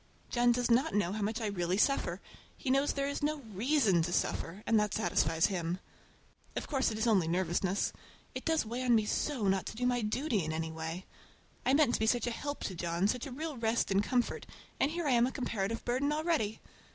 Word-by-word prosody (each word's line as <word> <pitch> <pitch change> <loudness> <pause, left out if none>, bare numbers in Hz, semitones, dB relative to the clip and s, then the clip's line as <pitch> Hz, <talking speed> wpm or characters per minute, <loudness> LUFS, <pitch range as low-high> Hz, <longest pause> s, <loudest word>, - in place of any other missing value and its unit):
John 240 0 +4
does 240 0 +1
not 260 +5 +3
know 205 -4 +1
how 215 - -3
much 215 +3 -1
I - - -1
really 185 -3 -1
suffer. 275 +6 +1 0.4
He 265 - -2
knows 275 +2 +2
there 275 0 -1
is 285 - -3
no 300 0 -1
reason 220 - +3
to 170 +2 -1
suffer, 180 +3 -1
and 225 -1 +4
that 210 -1 0
satisfies 165 -2 +2
him. 175 -3 -1 0.8
Of - - -2
course 270 -3 +1
it 215 - -4
is 220 - 0
only 200 -8 +3
nervousness. 180 +2 0 0.4
It - - -5
does 320 -6 +1
weigh 235 +3 -4
on 245 -2 +4
me 215 -1 +3
so 245 -1 -1
not 190 -1 +1
to - - -6
do 245 +2 -2
my 245 -1 +2
duty 220 - 0
in 155 0 -3
any 160 0 -3
way! 160 +3 -5 0.6
I 265 - +5
meant 285 -5 +4
to - - +1
be 220 - +1
such 240 +1 +2
a 240 - -1
help 285 +5 -4
to 190 - -3
John, 170 +2 0
such 250 +4 -1
a - - -8
real 300 +2 -5
rest 230 -2 0
and 195 +1 +4
comfort, 245 +2 -1 0.3
and 275 - +3
here 340 +1 -3
I 285 - +2
am 240 0 +4
a - - -3
comparative 230 -4 -3
burden 260 +4 +1
already! 305 -9 0
225 Hz, 225 wpm, -32 LUFS, 190-265 Hz, 0.8 s, I